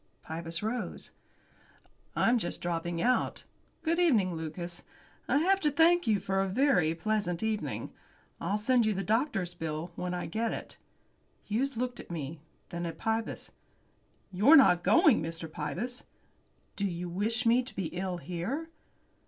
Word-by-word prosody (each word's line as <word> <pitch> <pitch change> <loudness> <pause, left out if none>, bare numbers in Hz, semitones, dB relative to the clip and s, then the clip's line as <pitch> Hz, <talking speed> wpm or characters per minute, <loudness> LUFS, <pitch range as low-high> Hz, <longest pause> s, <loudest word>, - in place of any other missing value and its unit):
Pybus 165 +2 -5
rose. 235 +3 -3 1.0
"I'm 240 +1 +3
just 175 - -4
dropping 170 0 -2
out. 250 +1 +1 0.4
Good 335 +1 +1
evening, 225 - +3
Lucas. 170 +2 -5 0.5
I - - +3
have 380 +6 +3
to 305 - +2
thank 330 +2 +4
you 210 -3 +3
for 195 0 0
a 195 - 0
very 190 - +3
pleasant 200 0 -1
evening. 220 -1 -2 0.5
I'll 205 - 0
send 240 +3 +3
you 215 - +1
the 195 - -2
doctor's 215 - 0
bill 160 0 -4
when 180 0 -3
I 175 - -3
get 225 +6 -1
it." - - -8 0.6
Hughes 245 +4 -1
looked 245 0 -2
at - - -10
me, 160 -2 -5 0.3
then 175 -1 -3
at 165 - -6
Pybus. 225 0 -2 0.8
"You're 210 - +6
not 180 - +7
going, 320 - +5
Mr. 165 0 -4
Pybus?" 175 +12 -4 0.7
"Do 200 - 0
you 175 -1 -4
wish 220 +7 -1
me 235 +2 +5
to 255 - -10
be 190 - -2
ill 180 0 -3
here?" 185 - -4
200 Hz, 155 wpm, -30 LUFS, 170-245 Hz, 1.0 s, not